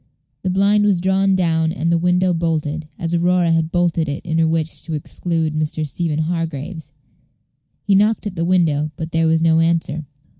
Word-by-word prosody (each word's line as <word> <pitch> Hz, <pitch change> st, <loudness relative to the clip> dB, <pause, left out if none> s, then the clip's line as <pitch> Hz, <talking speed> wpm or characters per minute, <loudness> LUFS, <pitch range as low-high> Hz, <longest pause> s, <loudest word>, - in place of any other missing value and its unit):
The 185 Hz, -, -2 dB
blind 200 Hz, +3 st, +3 dB
was 200 Hz, -4 st, +2 dB
drawn 190 Hz, +1 st, +2 dB
down 160 Hz, -3 st, +1 dB
and 170 Hz, -1 st, -1 dB
the 170 Hz, -, +3 dB
window 180 Hz, +1 st, +2 dB
bolted, 160 Hz, -2 st, -2 dB
as 165 Hz, 0 st, -3 dB
Aurora 175 Hz, 0 st, +2 dB
had 165 Hz, 0 st, +1 dB
bolted 170 Hz, -3 st, +1 dB
it 145 Hz, +6 st, -5 dB
in 165 Hz, -1 st, -1 dB
her 165 Hz, -, +3 dB
wish 160 Hz, 0 st, -2 dB
to 160 Hz, -, -3 dB
exclude 160 Hz, +1 st, -2 dB
Mr. 155 Hz, 0 st, -2 dB
Stephen 150 Hz, +2 st, -2 dB
Hargraves. 165 Hz, 0 st, -4 dB, 0.9 s
He 200 Hz, -, +1 dB
knocked 210 Hz, +3 st, +2 dB
at 200 Hz, -3 st, -4 dB
the 165 Hz, -, -1 dB
window, 165 Hz, -4 st, +1 dB
but 160 Hz, +2 st, -6 dB
there 165 Hz, 0 st, +2 dB
was 160 Hz, 0 st, +2 dB
no 160 Hz, -1 st, +4 dB
answer. 165 Hz, -2 st, 0 dB
165 Hz, 185 wpm, -19 LUFS, 160-180 Hz, 0.9 s, no